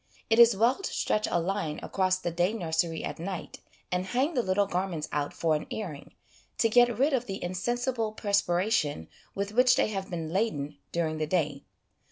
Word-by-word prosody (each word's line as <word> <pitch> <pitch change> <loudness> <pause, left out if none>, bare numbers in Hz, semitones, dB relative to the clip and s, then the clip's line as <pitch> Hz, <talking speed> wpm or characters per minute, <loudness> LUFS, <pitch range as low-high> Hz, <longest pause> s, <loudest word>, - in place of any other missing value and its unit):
It 225 - +5
is 235 -3 +7
well 235 - +3
to - - -4
stretch 215 - 0
a 175 - +1
line 170 -3 -2
across 185 -1 +1
the 175 -2 -3
day 175 +4 +1
nursery 165 -4 -1
at - - -5
night, 180 +1 -6 0.3
and 180 0 0
hang 260 - 0
the 255 - +2
little 200 -1 +1
garments 180 -4 -2
out 145 -1 -1
for 165 -2 0
an 150 - -2
airing, 165 -10 -6 0.4
to 225 - +3
get 240 0 +4
rid 275 +4 +2
of 245 -2 0
the 195 -1 -5
insensible 230 +5 -1
perspiration 185 - 0 0.3
with 200 +1 -2
which 250 +2 +5
they 250 - +2
have 195 -2 -4
been 165 -3 -4
laden 150 -9 -1
during 160 -2 -1
the 155 - -1
day. 150 -5 -1
190 Hz, 190 wpm, -28 LUFS, 165-225 Hz, 0.4 s, is